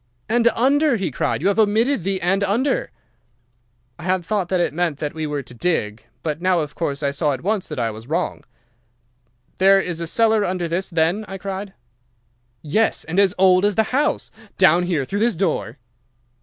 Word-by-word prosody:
"'And 235 +1 +2
under,' 280 +3 +3
he 190 -8 -2
cried. 140 - -2
'You - - +3
have 200 - 0
omitted 220 +4 +2
the 190 +2 -1
"and 195 +3 +1
under."' 235 +8 0 1.1
"I - - -9
had 185 -1 0
thought 190 -1 -1
that 185 - +1
it 175 - 0
meant 170 -3 -1
that 150 +2 -4
we 160 -1 -3
were 145 -1 -3
to 125 - -12
dig, 115 -7 -2 0.2
but 155 0 -3
now, 185 -2 +2
of 150 -2 -5
course, 145 -3 -3
I 140 - +1
saw 145 +1 0
at 130 - -6
once 205 0 -1
that - - -7
I 115 -2 -1
was 110 +2 -11
wrong. 170 +5 -2 1.2
'There 195 +1 +6
is 175 -3 -3
a 170 - -3
cellar 220 +3 +2
under 180 -2 -2
this 175 +3 -2
then?' 170 +5 +1
I 195 - -6
cried. 195 +1 -6 0.9
"'Yes, 215 +9 +1
and 175 +4 -1
as 195 -2 +3
old 185 0 +5
as 205 -1 +2
the 220 - +3
house. 285 +3 0 0.3
Down 175 +3 +4
here, 155 -7 0
through 200 +9 -3
this 230 -1 +2
door. 155 - -2
180 Hz, 195 wpm, -21 LUFS, 155-205 Hz, 1.2 s, There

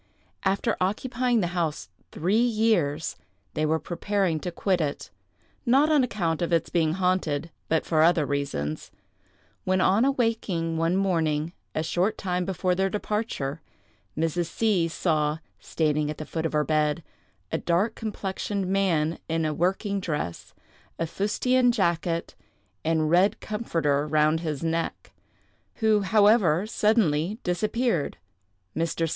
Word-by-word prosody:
After 200 +4 +1
occupying 240 +4 +1
the 175 -1 -2
house 165 -4 -2 0.2
three 190 +7 +1
years, 215 -11 +1 0.4
they 155 0 0
were 160 +1 +2
preparing 180 0 -1
to 180 - -4
quit 185 0 0
it—not 260 - -1
on 295 -4 +5
account 175 -9 -1
of 170 - -1
its 165 -1 +1
being 160 -2 +2
haunted, 170 -4 0 0.2
but 160 0 +1
for 155 -2 +2
other 165 -2 +4
reasons—when 140 - -4
on 195 +5 +4
awaking 225 -11 0
one 165 +3 +1
morning, 165 -4 0 0.2
a 155 - 0
short 185 +6 0
time 180 -2 -1
before 185 -1 0
their 190 +1 +1
departure, 205 -8 -3 0.6
Mrs. 165 +2 0
C—— 190 -2 +1
saw, 155 -2 0 0.2
standing 150 -2 0
at 150 - -4
the 155 - -6
foot 165 +1 -2
of - - -9
her 150 0 +2
bed, 155 +1 +1 0.5
a - - 0
dark 185 +6 +1
complexioned 200 -2 -3
man, 180 -5 +1
in 165 0 0
a 155 - 0
working 195 +5 0
dress, 150 - -4 0.4
a 165 - -1
fustian 245 +8 +2
jacket, 170 -5 0 0.5
and 160 -1 +1
red 185 +4 +4
comforter 165 -10 -1
round 155 +1 +3
his 155 -3 -4
neck—who, 205 +5 -3
however, 200 -4 +4
suddenly 210 -5 +1
disappeared. 210 - 0 0.6
Mr. 165 0 0
175 Hz, 130 wpm, -26 LUFS, 160-205 Hz, 0.6 s, on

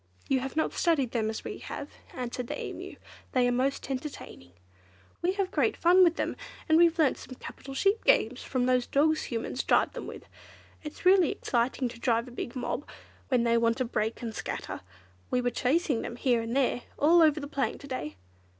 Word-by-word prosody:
"You 265 - +2
have 270 +2 -5
not 315 - 0
studied 290 -9 +1
them 220 -3 0
as 220 - -5
we - - -6
have," - - -6 0.3
answered 250 -1 -4
the - - -4
Emu. - - -6 0.4
"They 250 -1 +3
are - - +2
most 260 +2 0
entertaining. 255 - -7 0.7
We 360 +2 +1
have 390 -1 -1
great - - +1
fun 360 +2 +6
with 340 -2 +4
them, - - -2 0.3
and 315 - +4
we've 340 -1 +5
learnt 310 -5 +3
some 255 - -10
capital 270 +2 -9
sheep 395 +9 +2
games 255 - +3
from 255 -2 -1
those 250 -1 +2
dogs 310 +2 +2
Humans 235 +2 -3
drive - - +2
them - - -6
with. - - -9 0.6
It's 300 +3 -9
really 370 -3 +6
exciting 245 +2 0
to 235 - -9
drive 235 0 +1
a - - -10
big 240 0 -6
mob, 255 +3 -3 0.4
when 250 -3 +2
they 235 0 +3
want 230 0 +2
to 255 - 0
break 225 0 -2
and 225 -2 -4
scatter. - - -5 0.5
We 250 - +1
were 245 0 0
chasing 265 +1 +1
them, 235 - -5
here 240 -1 +2
and 230 +2 -4
there, 255 -2 +1 0.2
all 335 +4 +5
over 310 -1 +5
the 285 - -5
plain 280 -2 -2
to 280 - -12
day." 255 - -4
255 Hz, 205 wpm, -29 LUFS, 240-310 Hz, 0.7 s, fun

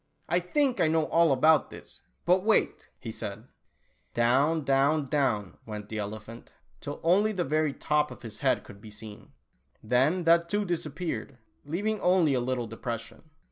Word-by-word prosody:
" - - -43
I 175 +2 +2
think 255 - 0
I 160 - +4
know 160 0 +2
all 165 -2 +4
about 150 +3 +4
this, - - -11 0.2
but 185 +1 +3
wait," 220 +1 +1
he 115 - -7
said. 105 0 -6 0.7
Down, 140 +7 +2
down, 140 +2 +2
down 130 -9 -1
went 105 -1 -7
the 110 - -4
elephant, 110 +3 -7 0.3
till 145 0 -6
only 195 +6 +3
the 185 -4 -1
very 155 +1 +1
top 150 -1 +1
of - - -12
his 115 -2 -8
head - - +1
could 100 0 -14
be 110 - -11
seen. 105 0 -11 0.5
Then 130 +11 +2
that 170 0 +4
too 205 +2 0
disappeared, 160 -5 -4 0.3
leaving 200 +8 -2
only 180 -5 +3
a 130 - +2
little 125 0 -1
depression. 115 +5 -7
145 Hz, 170 wpm, -28 LUFS, 115-170 Hz, 0.7 s, I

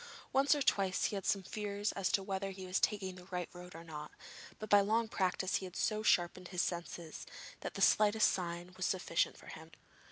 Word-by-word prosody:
Once 275 +2 +5
or 290 - 0
twice 195 -6 +2
he - - 0
had 195 - -4
some 195 -1 +2
fears 205 +1 -2
as 195 -2 -1
to 195 - +2
whether 195 0 -2
he 190 -1 -7
was 185 +2 0
taking 195 -3 0
the 180 -1 -12
right 180 -2 -4
road 180 -1 -10
or 165 - -8
not, 150 -2 -7 0.5
but 215 - -6
by 205 -1 +7
long 220 +3 +2
practice 190 -2 0
he 190 - -5
had 180 - -13
so 215 -1 0
sharpened 180 -3 +2
his 180 -1 0
other 175 -1 -3
senses 165 -2 -8 0.3
that - - -6
the - - +1
slightest 215 +1 +5
sign 175 0 -4
was 185 - -1
sufficient 175 -3 0
for - - -15
him. 160 +1 -10
190 Hz, 220 wpm, -35 LUFS, 180-205 Hz, 0.5 s, by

